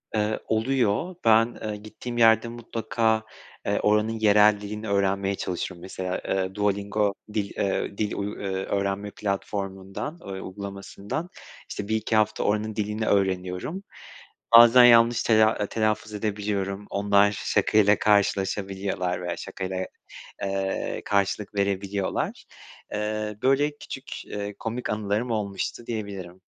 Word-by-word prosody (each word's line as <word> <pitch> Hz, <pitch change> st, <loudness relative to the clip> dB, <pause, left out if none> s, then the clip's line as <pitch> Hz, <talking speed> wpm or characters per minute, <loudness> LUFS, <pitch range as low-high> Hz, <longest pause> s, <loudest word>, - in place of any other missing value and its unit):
Eee, 105 Hz, 0 st, 0 dB
oluyor. 125 Hz, -, +1 dB
Ben, 115 Hz, +1 st, +4 dB
eee, 110 Hz, -1 st, -3 dB
gittiğim 110 Hz, +3 st, -7 dB
yerde 115 Hz, 0 st, +5 dB
mutlaka, 115 Hz, -1 st, -1 dB, 0.4 s
eee, 100 Hz, -, +1 dB
oranın 105 Hz, +2 st, +2 dB
yerel 105 Hz, 0 st, +5 dB
dilini 105 Hz, +1 st, -6 dB
öğrenmeye 100 Hz, 0 st, +1 dB
çalışırım. 90 Hz, -1 st, -4 dB
Mesela, 95 Hz, 0 st, -4 dB
eee, 95 Hz, 0 st, -1 dB
Duolingo 100 Hz, 0 st, 0 dB, 0.2 s
dil, 100 Hz, -2 st, -1 dB
eee, 100 Hz, 0 st, -1 dB
dil 105 Hz, -1 st, -1 dB
uy 100 Hz, +1 st, -3 dB
öğrenme 100 Hz, +1 st, -2 dB
platformundan, 100 Hz, -, -4 dB
ö 95 Hz, -1 st, -6 dB
uygulamasından, 100 Hz, -, -6 dB, 0.4 s
işte, 100 Hz, -, -5 dB
1-2 110 Hz, 0 st, 0 dB
hafta 110 Hz, -1 st, +2 dB
oranın 105 Hz, +1 st, 0 dB
dilini 105 Hz, +1 st, -2 dB
öğreniyorum. 95 Hz, -, 0 dB, 0.7 s
Bazen 120 Hz, +1 st, +10 dB
yanlış 115 Hz, -1 st, +6 dB
tela 110 Hz, -2 st, +3 dB
telaffuz 110 Hz, 0 st, -1 dB
edebiliyorum. 100 Hz, -1 st, -2 dB
Onlar 100 Hz, 0 st, +3 dB
şakayla 105 Hz, +1 st, +3 dB
karşılaşabiliyorlar 95 Hz, -2 st, 0 dB
veya 90 Hz, -, -3 dB
şakayla, 95 Hz, 0 st, -4 dB, 0.6 s
eee, 95 Hz, 0 st, -2 dB
karşılık 100 Hz, +1 st, 0 dB
verebiliyorlar. 100 Hz, -1 st, -1 dB, 0.5 s
Eee, 105 Hz, 0 st, -2 dB
böyle 145 Hz, +3 st, +2 dB
küçük, -, -, -8 dB
eee, 105 Hz, 0 st, -5 dB
komik 115 Hz, +2 st, -4 dB
anılarım 105 Hz, +3 st, -1 dB
olmuştu 105 Hz, +2 st, -3 dB
diyebilirim. 100 Hz, -5 st, -5 dB
105 Hz, 115 wpm, -26 LUFS, 100-110 Hz, 0.7 s, Bazen